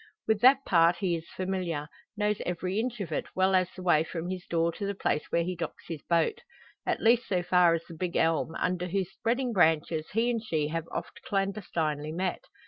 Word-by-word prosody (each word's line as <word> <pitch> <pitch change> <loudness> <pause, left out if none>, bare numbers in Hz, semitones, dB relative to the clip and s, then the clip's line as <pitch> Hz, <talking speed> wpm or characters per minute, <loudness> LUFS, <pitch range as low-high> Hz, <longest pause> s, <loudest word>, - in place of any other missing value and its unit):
With 220 -2 +2
that 265 +2 +6
part 170 -1 +5
he 180 -3 0
is 165 0 -7
familiar 185 -5 -3 0.3
knows 210 0 0
every 180 +3 -2
inch 240 0 -2
of 185 - -5
it, - - -2
well 190 +1 +3
as 185 -1 +3
the 185 - -8
way 160 -4 +4
from 165 +1 -5
his 185 -1 -6
door 170 0 +1
to 200 +4 -4
the 200 - -2
place 150 -5 0
where 170 - +2
he 180 +2 -3
docks 165 -2 -6
his 160 -4 -5
boat 180 - +1 0.5
at - - 0
least 235 +1 +4
so 180 -2 0
far 175 -2 +4
as 165 - -4
the 170 - -12
big 175 +2 -4
elm, 160 0 +1
under 180 0 -1
whose 190 +1 -1
spreading 240 +4 -1
branches 160 -3 +2
he 230 +3 +2
and 230 -2 -2
she 155 -8 -1
have 165 +1 -3
oft - - -6
clandestinely 170 -7 -1
met. 185 - -2
180 Hz, 215 wpm, -29 LUFS, 165-200 Hz, 0.5 s, that